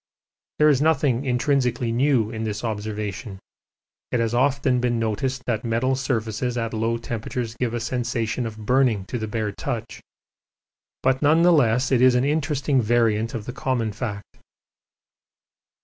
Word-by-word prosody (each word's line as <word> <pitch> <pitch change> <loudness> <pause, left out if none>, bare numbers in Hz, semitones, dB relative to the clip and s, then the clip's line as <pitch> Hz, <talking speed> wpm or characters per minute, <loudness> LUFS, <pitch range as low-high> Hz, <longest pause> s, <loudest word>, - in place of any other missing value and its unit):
There 150 - +5
is 140 -2 +3
nothing 140 -4 +2
intrinsically 125 -2 +1
new 120 -3 +2
in 110 -1 -4
this 110 0 -3
observation; 105 0 -4 0.7
it 125 - +1
has 115 0 0
often 130 0 +2
been 120 -1 0
noticed 120 +4 -2
that 115 -2 -1
metal 120 +3 +1
surfaces 125 -2 -2
at 115 -1 -2
low 115 +1 0
temperatures 115 0 -4
give 120 -2 -1
a - - -1
sensation 120 0 -2
of 110 -1 -8
burning 125 -5 +2
to 125 - -3
the 110 - -3
bare 105 -1 -2
touch, 115 +1 -5 1.0
but 130 0 +2
none 155 +3 +4
the 175 0 +6
less 125 -3 +2
it 125 -2 +3
is 130 -1 +6
an 125 +2 +2
interesting 145 -2 +1
variant 115 0 +1
of 110 -3 -5
the 125 - -6
common 130 -4 -1
fact. 105 -4 -6
120 Hz, 155 wpm, -23 LUFS, 110-130 Hz, 1.0 s, the